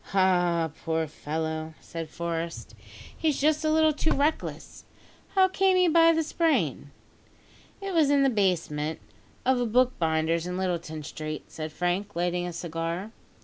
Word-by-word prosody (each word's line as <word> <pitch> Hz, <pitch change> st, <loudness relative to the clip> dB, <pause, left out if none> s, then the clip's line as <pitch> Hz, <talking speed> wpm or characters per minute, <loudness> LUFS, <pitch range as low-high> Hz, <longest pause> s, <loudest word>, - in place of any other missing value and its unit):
"Ah! 175 Hz, -4 st, +3 dB
poor 160 Hz, 0 st, 0 dB
fellow!" 160 Hz, +1 st, -4 dB
said 165 Hz, -2 st, -7 dB
Forest, 170 Hz, +1 st, -4 dB, 0.4 s
"he's 310 Hz, -3 st, 0 dB
just 305 Hz, +2 st, +2 dB
a 310 Hz, -, +2 dB
little 315 Hz, 0 st, +4 dB
too 315 Hz, -, -1 dB
reckless. 295 Hz, +3 st, -2 dB, 0.5 s
How 380 Hz, -1 st, +6 dB
came 380 Hz, 0 st, +2 dB
he 365 Hz, -1 st, +4 dB
by 330 Hz, 0 st, +6 dB
the 325 Hz, 0 st, +1 dB
sprain?" 325 Hz, +1 st, 0 dB, 0.9 s
"It 395 Hz, -1 st, -4 dB
was 315 Hz, -4 st, +4 dB
in 285 Hz, -1 st, +4 dB
the 270 Hz, -, +4 dB
basement 165 Hz, -7 st, 0 dB, 0.5 s
of 260 Hz, 0 st, +3 dB
a -, -, +1 dB
bookbinder's 170 Hz, -9 st, +1 dB
in 180 Hz, 0 st, -3 dB
Littleton 170 Hz, -4 st, -3 dB
Street," 155 Hz, +1 st, -6 dB
said 155 Hz, -1 st, -5 dB
Frank, 180 Hz, +5 st, -2 dB
lighting 175 Hz, +1 st, 0 dB
a -, -, -4 dB
cigar. 170 Hz, +4 st, -4 dB
180 Hz, 145 wpm, -27 LUFS, -, 0.9 s, How